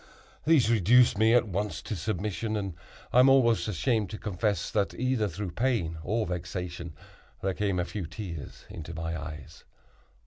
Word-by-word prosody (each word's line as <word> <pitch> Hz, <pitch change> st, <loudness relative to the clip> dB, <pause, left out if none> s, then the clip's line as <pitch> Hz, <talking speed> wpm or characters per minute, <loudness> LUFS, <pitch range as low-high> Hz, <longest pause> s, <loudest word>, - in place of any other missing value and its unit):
These 150 Hz, -7 st, +4 dB
reduced 115 Hz, +2 st, +5 dB
me 110 Hz, +2 st, +5 dB
at 120 Hz, -2 st, +4 dB
once 100 Hz, +2 st, -2 dB
to 110 Hz, -, -4 dB
submission, 105 Hz, +3 st, -2 dB
and 100 Hz, -3 st, -3 dB, 0.4 s
I 125 Hz, -, +6 dB
am 130 Hz, +2 st, +7 dB
almost 120 Hz, -5 st, +4 dB
ashamed 110 Hz, +1 st, 0 dB
to 110 Hz, -, -6 dB
confess 100 Hz, -3 st, -1 dB
that 100 Hz, -2 st, 0 dB
either 125 Hz, -4 st, +1 dB
through 100 Hz, -2 st, -5 dB
pain 105 Hz, -9 st, 0 dB
or 110 Hz, +8 st, 0 dB
vexation, 85 Hz, -1 st, -5 dB, 0.5 s
there 95 Hz, 0 st, +1 dB
came 100 Hz, -2 st, 0 dB
a 90 Hz, -, 0 dB
few 95 Hz, -3 st, -5 dB
tears 85 Hz, -7 st, -8 dB
into 80 Hz, +1 st, -8 dB
my 80 Hz, 0 st, -3 dB
eyes. 75 Hz, 0 st, -8 dB
100 Hz, 165 wpm, -28 LUFS, 85-115 Hz, 0.5 s, am